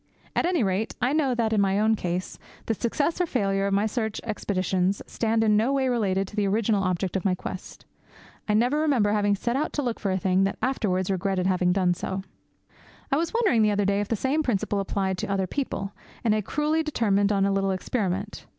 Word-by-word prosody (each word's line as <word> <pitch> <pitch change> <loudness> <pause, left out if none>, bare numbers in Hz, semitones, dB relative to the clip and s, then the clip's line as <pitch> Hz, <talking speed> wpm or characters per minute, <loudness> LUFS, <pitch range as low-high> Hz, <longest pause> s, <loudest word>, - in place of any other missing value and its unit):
At - - +2
any 350 -8 +1
rate, 195 +3 -1
I 250 +3 +1
know 280 -5 +2
that, 225 -2 0
in 210 - +3
my 195 0 +2
own 220 +1 +3
case, 180 -3 -3 0.3
the 225 - 0
success 285 - -1
or 355 - +1
failure 195 -7 0
of 200 - -1
my 200 +2 +2
search 220 -1 -2
expeditions 190 -3 -1
stand 225 -1 0
in 210 -1 +4
no 225 +5 +2
way 265 -1 +1
related 195 -5 0
to - - -12
the 205 -2 +1
original 210 0 +1
object 185 0 -1
of 190 - -1
my 190 -2 +2
quest. 180 - -8 0.6
I 210 - +3
never 245 +7 +2
remember 265 -10 +2
having 205 -1 +2
set 235 +5 -2
out 300 +3 -1
to 290 - -1
look 240 -3 -2
for 200 - -2
a 185 - +1
thing, 190 +1 +2
and - - -5
afterwards 195 -8 0
regretted 190 -1 0
having 185 -1 +2
done 180 -1 +2
so. 190 +2 -4 0.9
I 275 - +3
was 330 +1 -1
wondering 430 - +3
the 215 - +4
other 205 -1 +1
day 200 +1 +2
if 205 - -3
the 225 - 0
same 270 +8 0
principle 210 -6 0
applied 190 -1 -1
to - - -2
other 195 -1 0
people, 200 -3 -3 0.3
and 220 - +3
I 215 - +1
cruelly 300 +8 0
determined 210 -10 +1
on 195 -1 +2
a 200 - +2
little 195 0 +1
experiment. 190 0 -2
205 Hz, 225 wpm, -26 LUFS, 195-240 Hz, 0.9 s, in